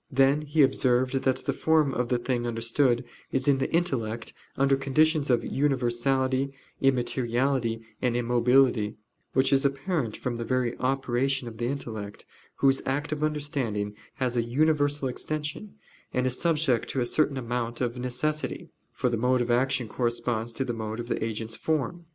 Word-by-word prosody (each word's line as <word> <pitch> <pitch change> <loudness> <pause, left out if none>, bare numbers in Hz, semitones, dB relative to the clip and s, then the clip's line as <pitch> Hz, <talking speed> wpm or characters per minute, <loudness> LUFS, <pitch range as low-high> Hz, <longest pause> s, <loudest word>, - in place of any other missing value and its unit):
Then 135 +2 +3
he 150 0 +3
observed 130 -1 +2
that 130 -1 +2
the - - +1
form 155 -4 +2
of 125 0 -1
the 125 - +2
thing 120 0 -1
understood 120 +2 +1 0.3
is 130 0 0
in 140 -2 +4
the - - -1
intellect 120 -10 -1 0.2
under 135 0 +4
conditions 150 +2 +2
of 120 -2 +2
universality, 130 0 +1 0.3
immateriality, 125 -2 +1 0.2
and 120 -2 +1
immobility: 120 -2 +3 0.4
which 130 +1 +3
is 135 +1 +4
apparent 140 - -1
from 120 -2 -3
the 115 - -3
very 125 -1 0
operation 135 0 0
of 115 -1 -8
the 120 - 0
intellect, 110 -6 -5 0.3
whose 135 -1 +3
act 145 +2 -1
of 150 0 -2
understanding 135 -9 -1 0.2
has 125 -2 -1
a 120 - +3
universal 145 +3 +1
extension, 150 - -4 0.4
and 125 0 0
is 130 0 -1
subject 150 -8 +1
to 135 - -1
a 120 - +1
certain 145 +1 +1
amount 120 -1 -3
of 120 -1 -1
necessity: 130 +5 -2 0.2
for - - -1
the 120 -1 0
mode 125 +3 +2
of 120 0 0
action 125 0 +1
corresponds 120 0 -1
to 135 - -2
the 120 - -2
mode 110 0 -4
of 120 0 -5
the - - -1
agent's 110 0 -3
form. 160 +2 -2
130 Hz, 165 wpm, -27 LUFS, 120-140 Hz, 0.4 s, in